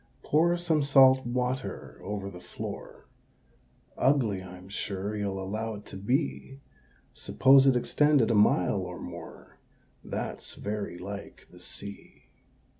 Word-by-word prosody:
Pour 170 +3 +3
some 170 -3 +1
salt 135 -2 +6
water 125 +1 -3
over 100 -1 -4
the 90 - -10
floor 90 - -8 0.9
Ugly 125 -8 +2
I'm 90 0 -11
sure 100 +1 -4
you'll 100 -2 -2
allow 110 +4 -3
it 105 0 -11
to - - -11
be: 135 +6 -2 0.5
Suppose 135 +1 +5
it 135 - +5
extended 135 0 +3
a - - +3
mile 100 -2 +3
or 90 -1 -6
more, - - -10 0.4
That's - - -5
very 105 -3 -4
like 100 +3 -8
the - - -15
Sea. 100 0 -10
105 Hz, 125 wpm, -28 LUFS, 100-135 Hz, 0.9 s, salt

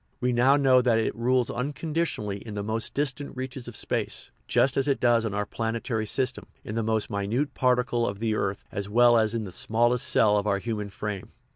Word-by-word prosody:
We 125 0 0
now 130 +4 +5
know 130 -3 +5
that 120 -2 +3
it 110 - 0
rules 125 +1 +1
unconditionally 145 -6 -2
in 105 +1 -8
the 100 - -3
most 110 +2 -3
distant 140 -1 -2
reaches 130 -1 -5
of 120 - -7
space, - - -3 0.2
just 130 - +2
as 135 +1 +1
it 140 - +1
does 120 -2 +3
in 105 -2 -3
our 105 0 -1
planetary 115 0 -3
system, 130 +3 -1 0.2
in 105 - -6
the 115 - 0
most 110 0 -1
minute 115 +8 -1
particle 125 -2 +1
of 100 - -3
the 110 +1 -1
earth 100 -2 -2
as 100 +1 -4
well 120 +2 +5
as 110 0 +2
in 115 - -1
the 95 - -7
smallest 120 +5 +1
cell 105 -1 +4
of 100 - -3
our 100 -1 +2
human 105 0 -4
frame. 100 -1 -5
115 Hz, 215 wpm, -26 LUFS, 105-125 Hz, 0.2 s, now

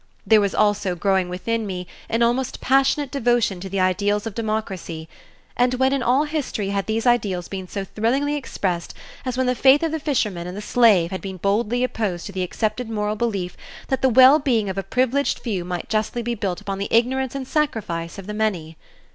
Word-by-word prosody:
There 220 -2 +5
was 200 -1 0
also 205 -3 +2
growing 190 0 +1
within 220 +5 -2
me 180 -2 -4 0.2
an 230 +1 +2
almost 245 +2 0
passionate 270 +1 +2
devotion 240 -7 +1
to 190 +2 -7
the 195 +1 -2
ideals 200 +3 +1
of 225 - -4
democracy, 195 -7 -4 0.5
and 245 +1 +2
when 265 +1 +2
in 275 - 0
all 255 +4 +3
history 295 -10 -3
had 200 -1 -2
these 220 +2 -1
ideals 205 -8 +1
been 190 -2 -6
so 195 +1 -4
thrillingly 260 +9 0
expressed 185 -11 -3 0.3
as 255 -1 -2
when 260 - +1
the 250 - +2
faith 270 +4 +5
of 325 - 0
the 320 - -2
fisherman 215 - -1
and 180 +2 -6
the - - -3
slave 210 -6 +4
had 190 - -4
been 190 -1 -6
boldly 210 +6 0
opposed 215 -8 -2
to - - -6
the 190 -1 -3
accepted 215 +5 -2
moral 210 -1 -1
belief 200 -6 -2 0.3
that 265 - 0
the 265 - +4
well 260 +5 +7
being 235 -8 +1
of 190 - -4
a - - 0
privileged 255 +7 0
few 200 -7 -3
might 175 -1 -4
justly 220 +2 -1
be 240 +1 -1
built 195 -5 -3
upon 195 -1 -4
the 200 - -2
ignorance 260 +3 +1
and 265 -2 -4
sacrifice 205 - -2
of 195 - -8
the 210 - -5
many? 180 -7 -2
215 Hz, 205 wpm, -22 LUFS, 190-250 Hz, 0.5 s, well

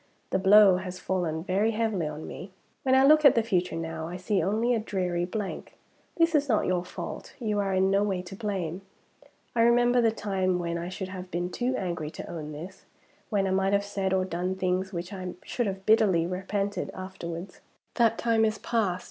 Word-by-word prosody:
The 190 - +2
blow 195 0 +7
has 185 0 -6
fallen 175 -4 -2
very 200 +5 +1
heavily 215 -7 0
on 150 +1 -6
me. 185 - -8 0.3
When 260 -1 +3
I 265 - +6
look 305 +2 +6
at 280 - +8
the 230 - +3
future 180 -6 0
now, 165 -1 -4
I 175 +2 -6
see 190 +2 0
only 220 +7 +1
a 230 - +1
dreary 180 -5 -1
blank. 200 +2 -5 0.4
This 335 0 +3
is 290 -2 +2
not 215 - +2
your 180 -1 0
fault 180 - -7
you 215 -4 -1
are 195 -1 0
in 190 0 +2
no 195 +1 +3
way 195 -3 -1
to 185 +1 -9
blame. 190 -5 -3 0.7
I 230 - +3
remember 240 +1 +4
the 230 - +4
time 190 -4 -1
when 170 -1 -2
I 170 +1 -4
should 185 0 -5
have 185 -1 -7
been 175 0 -3
too 250 +5 -1
angry 170 -6 -3
to - - -8
own 155 -3 -6
this 170 +6 -9 0.4
when 200 -3 +1
I 190 - 0
might 195 +1 +1
have 200 0 +2
said 195 -2 -2
or 190 -1 +2
done 180 +1 -2
things 185 0 -1
which 175 +1 -5
I 185 -2 -5
should 240 -3 -2
have 190 -1 -5
bitterly 210 -7 +4
repented 195 +2 -2
afterwards. 185 -1 -7 0.3
That 230 -2 +3
time 230 -1 +2
is 215 0 +1
past. 205 -7 0
190 Hz, 205 wpm, -27 LUFS, 180-215 Hz, 0.7 s, at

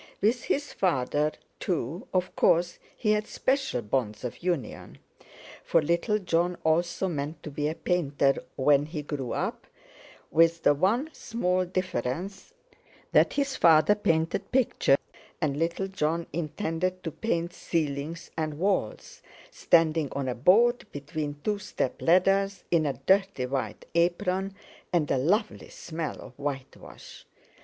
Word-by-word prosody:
With 230 +4 +1
his 285 +1 -1
father, 150 -3 +1 0.3
too, 165 -1 -3
of 185 -1 -1
course, 175 +1 +2 0.2
he 210 - +1
had 215 0 +1
special 265 - 0
bonds 105 -1 -2
of 125 - -5
union; 170 -9 -3 0.7
for 165 - +3
little 170 +7 +1
Jon 175 -2 0
also 170 +4 +1
meant 150 -2 -4
to 150 - -7
be 145 +1 -1
a 155 - -2
painter 145 -7 +1
when 145 +2 +3
he 155 -1 -5
grew 140 -4 -4
up—with 165 +1 -2
the 145 - +6
one 225 - +1
small 185 -5 -1
difference, 185 - -3 0.6
that - - +4
his 280 -1 0
father 165 +4 +6
painted 170 -2 0
pictures, 250 - +3 0.4
and 150 -4 0
little 170 +4 -1
Jon 170 -3 -1
intended 165 +3 -2
to 165 - -3
paint 170 -3 -2
ceilings 155 -1 -3
and 155 -2 -2
walls, 185 - -1 0.3
standing 160 -3 +2
on 140 -1 -2
a 125 - 0
board 225 - +4
between 145 0 -5
two 210 -1 0
step 160 -9 -3
ladders, 195 +2 +3
in 160 -3 +3
a 140 - 0
dirty 195 -8 +2
white 130 +1 -3
apron, 180 +3 +1 0.4
and 165 -5 +1
a 135 - +2
lovely 205 - 0
smell 160 -1 -5
of - - -11
whitewash. 140 -2 -7
170 Hz, 135 wpm, -27 LUFS, 145-190 Hz, 0.7 s, the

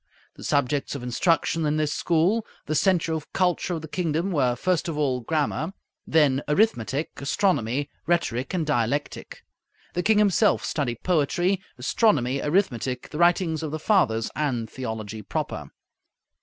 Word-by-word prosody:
The - - -13
subjects 140 +1 0
of 135 - -6
instruction 165 +6 +1
in 150 0 +1
this 150 -1 0
school, 180 +7 +2 0.2
the 155 - -2
centre 165 +1 +2
of 155 -2 -5
culture 180 -1 +1
of 160 - -6
the - - -6
kingdom, 170 +2 -1
were 130 -7 +2
first 175 +7 0
of 160 -3 -3
all, 135 -4 +1
grammar; 155 +4 -1 0.3
then 145 -4 +3
arithmetic, 150 - +1
astronomy, 140 - 0 0.2
rhetoric, 150 -7 0
and 165 -3 0
dialectic. 145 0 -2 0.5
The 180 - 0
king 210 +3 +3
himself 210 0 +3
studied 125 -7 -2
poetry, 180 +3 +1 0.2
astronomy, 140 - +2
arithmetic, 135 - 0
the 150 - -5
writings 175 -2 +3
of 160 - -3
the 155 - -3
Fathers, 155 - +2
and 130 -7 -1
theology 110 -3 -5
proper. - - -4
155 Hz, 145 wpm, -25 LUFS, 130-175 Hz, 0.5 s, then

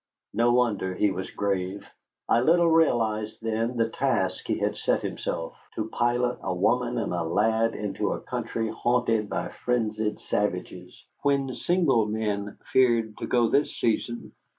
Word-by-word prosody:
No 120 +1 +3
wonder 110 -7 +1
he 105 +2 +2
was 95 0 -4
grave. 100 -1 -2 0.4
I 115 - +4
little 170 +4 +4
realized 110 -9 +2
then 115 +2 -1
the 115 -1 +2
task - - -1
he - - 0
had - - -1
set - - 0
himself, 80 - -3 0.2
to 110 0 -3
pilot 120 +1 0
a 95 - -2
woman 120 +6 +1
and 110 -5 -1
a 85 - -1
lad 110 +7 +1
into 105 -2 -2
a - - -4
country 115 -1 -3
haunted 115 -2 +1
by - - -2
frenzied 110 -3 -1
savages, - - -3 0.2
when 140 -2 +1
single 150 - +2
men 105 -2 -2 0.2
feared 115 -4 +3
to - - -4
go 120 -2 +3
this 145 - +1
season. 120 +1 -1
115 Hz, 150 wpm, -26 LUFS, 105-125 Hz, 0.4 s, I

